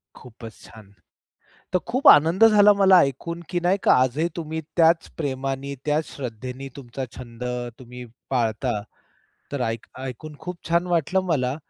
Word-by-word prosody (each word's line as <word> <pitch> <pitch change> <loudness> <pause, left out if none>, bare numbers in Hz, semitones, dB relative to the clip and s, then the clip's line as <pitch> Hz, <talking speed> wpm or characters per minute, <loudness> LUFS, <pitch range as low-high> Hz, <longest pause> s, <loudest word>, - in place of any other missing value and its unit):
खूपच 115 -2 -12
छान! 105 -2 -15 0.8
तर 180 - +3
खूप 255 +4 +1
आनंद 165 +9 +7
झाला 210 -1 +6
मला 195 -2 +5
ऐकून, 170 +6 -4
की 175 -2 -1
नाही 180 +3 +1
का, - - +5
आजही 130 +6 +2
तुम्ही 160 -1 -4
त्याच 165 0 +3
प्रेमानी, 135 -1 -3
त्याच 150 +1 +1
श्रद्धेने 130 +1 -6
तुमचा 130 -1 -6
छंद 120 -1 -9 0.4
तुम्ही 125 0 -10 0.3
पाळता. 115 -2 -1 0.7
तर 140 -3 -3
ऐक 115 -1 -3
ऐकून 135 +4 -7
खूप 180 -1 -7
छान 170 +1 +2
वाटलं 175 +2 +1
मला. 130 -4 0
140 Hz, 145 wpm, -23 LUFS, 125-170 Hz, 0.8 s, आनंद